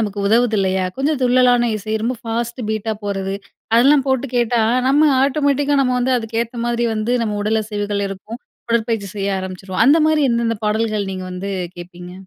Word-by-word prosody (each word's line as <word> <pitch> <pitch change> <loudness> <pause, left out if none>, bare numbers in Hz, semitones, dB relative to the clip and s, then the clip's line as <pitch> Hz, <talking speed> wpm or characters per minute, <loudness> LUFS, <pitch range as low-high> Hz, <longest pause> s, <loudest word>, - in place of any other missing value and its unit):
நமக்கு 205 -2 -3
உதவுது 230 0 +3
இல்லையா? 190 -1 +1
கொஞ்சம் 280 +1 0
துள்ளலான 245 -1 +4
இசை, 215 +1 -5
ரொம்ப 245 +2 -1
ஃபாஸ்ட்டு 235 0 -3
பீட்டா 220 0 -2
போறது. 195 -1 -2 0.4
அதெல்லாம் 270 +3 +5
போட்டு 265 0 +1
கேட்டா 240 -1 +2 0.3
நம்ம 295 +2 +4
ஆட்டோமேட்டிக்கா 285 0 +1
நம்ம 255 -1 +1
வந்து 255 +1 +1
அதுக்கேத்த 230 +1 -3
மாதிரி 240 0 0
வந்து 220 +3 -1
நம்ம 210 -2 -2
உடல் 220 +1 +1
அசைவுகள் 205 -1 -3
இருக்கும். 210 +5 -8 0.3
உடற்பயிற்சி 225 -3 0
செய்ய 200 -1 -1
ஆரம்பிச்சுருவோம். 185 +1 -3
அந்தமாரி 310 +1 +4
எந்தெந்த 235 -1 0
பாடல்கள், 215 -1 0
நீங்க 185 0 -5
வந்து 190 +2 -5 0.3
கேட்பீங்க? 175 0 -10
225 Hz, 160 wpm, -19 LUFS, 200-250 Hz, 0.4 s, அதெல்லாம்